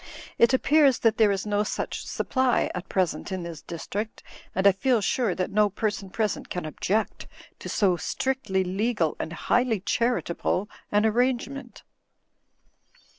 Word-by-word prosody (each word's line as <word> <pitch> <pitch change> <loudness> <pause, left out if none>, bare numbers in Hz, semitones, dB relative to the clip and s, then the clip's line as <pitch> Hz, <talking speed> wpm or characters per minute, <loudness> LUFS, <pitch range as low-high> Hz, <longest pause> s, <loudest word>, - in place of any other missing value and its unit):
It 235 - +6
appears 275 0 +4
that 225 -1 +2
there 220 -2 +5
is 195 0 -1
no 205 0 +1
such 210 - -3
supply 260 -2 +1
at 180 +1 -6
present 185 -1 -1
in 185 -2 -3
this 170 -2 -7
district, 205 +6 -5 0.3
and 190 - 0
I 200 - +9
feel 230 +6 +2
sure 215 -1 0
that 185 +2 -2
no 210 +1 +3
person 205 -1 -3
present 210 +1 -2
can 180 -2 -4
object 200 +7 -2 0.3
to - - -7
so 185 -4 +2
strictiy 190 -3 -1
legal 195 -3 0
and - - -4
highly 230 +6 +1
charitable 210 -3 0 0.2
an 210 +1 +3
arrangement." 250 +4 -1
210 Hz, 145 wpm, -26 LUFS, 185-235 Hz, 0.3 s, I